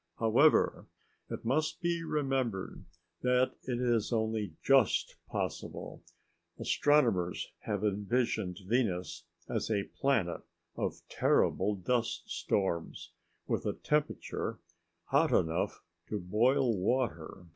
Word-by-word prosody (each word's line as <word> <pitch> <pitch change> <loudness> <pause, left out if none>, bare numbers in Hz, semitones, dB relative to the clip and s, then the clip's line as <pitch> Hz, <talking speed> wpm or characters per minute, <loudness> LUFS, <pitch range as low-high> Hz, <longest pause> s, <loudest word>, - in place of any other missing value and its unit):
However, 120 +7 +4 0.4
it - - -6
must 155 +6 0
be 170 -1 -1
remembered 135 - -2 0.4
that 125 0 +2
it 120 -2 -2
is 120 -3 +1
only 110 -6 -1
just 135 -6 +3
possible. - - -4 0.6
Astronomers 115 -12 +2
have 105 -1 -2
envisioned 105 -2 0
Venus 100 -5 -1 0.2
as - - -2
a 100 -3 +1 0.2
planet 135 -11 +1 0.3
of - - -3
terrible 100 +2 +2
dust 115 +5 -1
storms, 85 -5 -2 0.3
with - - -1
a - - 0
temperature 150 0 -1 0.5
hot - - +3
enough 80 +1 +1 0.3
to 105 - -2
boil 120 +7 +2
water. 95 -4 -1
115 Hz, 105 wpm, -32 LUFS, 95-130 Hz, 0.6 s, However